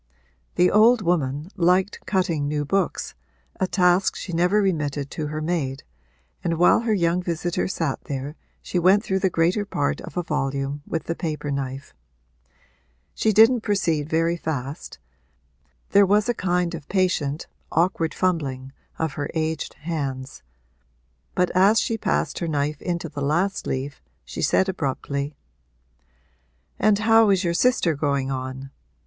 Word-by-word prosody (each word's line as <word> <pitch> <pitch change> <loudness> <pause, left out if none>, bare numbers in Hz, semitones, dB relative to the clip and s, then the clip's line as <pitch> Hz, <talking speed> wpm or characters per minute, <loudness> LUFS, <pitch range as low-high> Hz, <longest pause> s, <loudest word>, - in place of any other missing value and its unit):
The 180 +1 +4
old 220 +2 +5
woman 155 -2 0
liked 185 +2 +2
cutting 175 -7 0
new 145 0 -1
books, 195 +3 -1 0.5
a 190 - +1
task 180 0 +3
she 175 - -6
never 180 +5 +3
remitted 150 -7 -1
to 155 - -3
her 155 +1 -4
maid, 145 -5 -2 0.6
and 170 -2 0
while 175 - +5
her 225 -1 0
young 170 -1 +1
visitor 175 0 -2
sat 165 -7 -3
there 140 +2 -5 0.3
she 180 - -1
went 190 +4 +4
through 190 -4 0
the 190 - +2
greater 175 +5 +1
part 145 -8 -2
of - - -9
a 175 - 0
volume 140 -2 -2
with 165 - -2
the 165 - -2
paper 155 -3 -4
knife. 135 0 -4 1.2
She 220 - +1
didn't 225 +3 +6
proceed 170 -8 0
very 165 +1 +1
fast 145 -3 -5 0.9
there 200 -1 +6
was 210 +3 +3
a 240 - +2
kind 180 -4 0
of 160 -3 -8
patient, 175 -6 0 0.3
awkward 165 -2 +1
fumbling 140 -8 -1 0.3
of 160 -3 -2
her 145 -1 -4
aged 160 -1 -2
hands; 140 -5 -5 0.9
but 180 0 +2
as 200 +5 +5
she 230 - 0
passed 225 - -1
her 170 - -2
knife 150 -1 -1
into 170 -1 -2
the 145 -2 -7
last 170 +8 0
leaf 135 +2 -4 0.2
she - - -6
said 180 +5 +3
abruptly 140 -4 -3 1.4
'And 215 -1 +4
how 225 0 +5
is 195 -1 +3
your 170 -1 0
sister 185 -4 +2
going 140 -2 -1
on? 130 +1 -5
165 Hz, 150 wpm, -23 LUFS, 145-185 Hz, 1.4 s, didn't